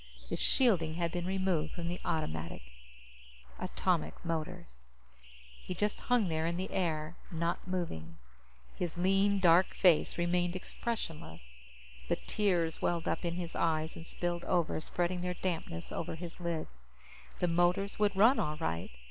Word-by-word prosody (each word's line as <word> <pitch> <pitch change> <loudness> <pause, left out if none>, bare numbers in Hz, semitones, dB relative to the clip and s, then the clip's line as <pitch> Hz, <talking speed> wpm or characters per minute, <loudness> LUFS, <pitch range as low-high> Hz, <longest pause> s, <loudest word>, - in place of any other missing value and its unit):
The - - +1
shielding 175 -11 +3
had 170 -1 0
been 175 0 -2
removed 185 -5 0
from 170 -1 -4
the 175 +1 -3 1.6
atomic 75 +1 0
motors. 155 - -4 0.8
He 185 - -4
just 210 +3 0
hung 245 -5 +2
there 160 -1 0
in 170 +1 -1
the 185 +1 -3
air, 160 -2 -1
not 170 0 -2
moving. 85 - -3 0.6
His 175 -1 -3
lean, 195 +3 +3
dark 180 0 +5
face 175 -5 +4
remained 175 +1 +1
expressionless, 150 - -5 0.5
but - - -1
tears 175 -6 +1
welled 170 -1 0
up - - 0
in 170 -1 -1
his 175 -2 -4
eyes 160 -1 +1
and 165 - -9
spilled 175 0 -2
over, 170 -4 +1
spreading 175 +2 -1
their 180 0 -2
dampness 165 - -3
over - - -3
his 170 +1 -8
lids. 155 - -4 0.5
The 180 - +1
motors 175 +4 +2
would 205 -2 +3
run, 225 +8 +6
all 150 0 -1
right. 85 - -2
175 Hz, 145 wpm, -33 LUFS, 160-185 Hz, 1.6 s, run